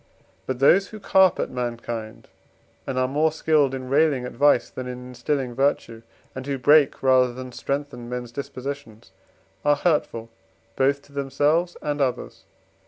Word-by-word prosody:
But 130 - -2
those 175 +9 +4
who 215 - -10
carp 190 -2 +4
at - - -2
mankind, 120 -3 -5 0.6
and 130 - -3
are 130 0 +2
more 150 +4 +1
skilled 150 -3 +2
in 130 -1 -6
railing 140 -2 +2
at 125 - -6
vice 145 0 +3
than 130 -1 -7
in 125 0 -7
instilling 125 +1 -2
virtue, 125 -3 -1 0.3
and 130 - -6
who 140 -1 -1
break 145 +2 +4
rather 130 -1 +4
than 130 +1 -8
strengthen 140 -2 -4
men's 125 -1 -5
dispositions, 130 -5 -7 0.5
are 145 0 +4
hurtful 140 -8 -1 0.4
both 140 +1 +1
to - - -21
themselves 145 +5 0
and 145 -1 -2
others. 130 -2 -3
135 Hz, 155 wpm, -24 LUFS, 125-145 Hz, 0.6 s, those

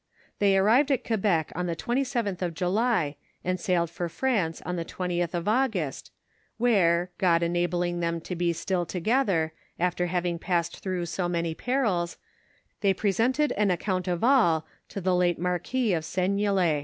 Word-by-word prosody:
They 200 -1 +4
arrived 230 +9 +4
at 265 - +1
Quebec 195 -8 +1
on 180 +1 -2
the 170 - -2
27th 240 -2 -1
of 175 -3 -2
July, 180 -3 +1 0.3
and 185 0 -1
sailed 170 -2 0
for 175 -1 -3
France 195 -7 0
on 180 - -2
the 170 - -2
20th 175 0 -2
of 175 +2 -3
August, 215 - 0 0.5
where, 180 -7 +3
Ood 170 -2 +4
enabling 175 0 0
them 170 0 -1
to 180 - -5
be 175 0 +1
still 175 +2 -1
together, 180 -3 0 0.3
after 180 0 0
having 175 -1 -1
passed 170 -1 -1
through 185 -2 -2
so 175 +1 -2
many 170 -1 -1
perils, 210 -7 -1 0.6
they 195 -2 +2
presented 245 +10 +1
on 210 0 +2
account 185 +1 -1
of 175 +1 -1
all 215 - +4 0.2
to 200 - -5
the 185 +1 +1
late 175 -1 +2
mar 180 +1 0
quis 245 -5 0
of 160 - -2
Seignelay. 185 -2 +1
180 Hz, 165 wpm, -27 LUFS, 170-205 Hz, 0.6 s, They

